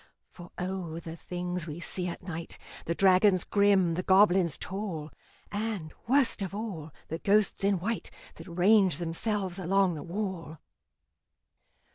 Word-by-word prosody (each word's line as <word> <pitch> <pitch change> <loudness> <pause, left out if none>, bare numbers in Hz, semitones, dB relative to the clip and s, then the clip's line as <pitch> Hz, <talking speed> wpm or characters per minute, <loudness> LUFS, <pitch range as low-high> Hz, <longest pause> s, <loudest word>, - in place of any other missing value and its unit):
For 175 -1 -12
O! 180 -3 -4
the 165 -1 -8
things 180 0 -4
we 155 +2 -6
see 180 +1 -2
at 175 - -6
night 170 -2 -6 0.3
The 170 - -1
dragons 185 0 +4
grim, 200 -4 +3
the 175 - -1
goblins 190 -4 +4
tall, 185 -6 -5 0.4
And, 205 -6 -3
worst 260 -3 +3
of 195 0 -4
all, 185 -8 -5 0.2
the 160 - -3
ghosts 205 +1 +2
in 200 -1 +3
white 210 +6 -3 0.3
That 165 - -11
range 185 -1 +4
themselves 185 +2 -2
along 190 0 +2
the 150 - -6
wall! 175 -4 -4
185 Hz, 140 wpm, -29 LUFS, 170-200 Hz, 0.4 s, dragons